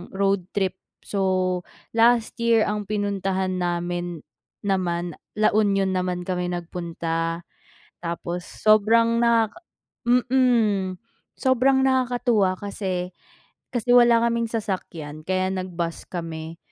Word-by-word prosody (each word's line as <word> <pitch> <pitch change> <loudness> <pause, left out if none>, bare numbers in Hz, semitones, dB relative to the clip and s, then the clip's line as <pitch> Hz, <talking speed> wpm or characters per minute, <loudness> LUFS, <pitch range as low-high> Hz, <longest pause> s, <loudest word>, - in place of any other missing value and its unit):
road 195 -2 +1
trip. 190 -2 +1 0.3
So 185 -2 0 0.3
last 230 0 +3
year 230 -1 +4
ang 210 -1 -2
pinuntahan 195 -2 -1
namin 175 -1 -2 0.4
naman, 175 -4 -1 0.2
La 215 - +4
Union 200 -2 +2
naman 180 -1 -1
kami 180 -1 -2
nagpunta. 165 -1 -3 0.6
Tapos 170 +1 -4
sobrang 230 +2 +3
nakaka 230 +4 +2 0.5
mm, 240 -7 +2 0.4
sobrang 265 +1 +3
nakakatuwa 245 -7 +2
kasi 185 -3 -4 0.6
kasi 245 0 +1
wala 240 -1 +6
kaming 235 0 +1
sasakyan, 175 -9 -4
kaya 185 +1 0
nag-bus 180 -3 -3
kami, 165 -2 -6
195 Hz, 100 wpm, -24 LUFS, 175-230 Hz, 0.6 s, wala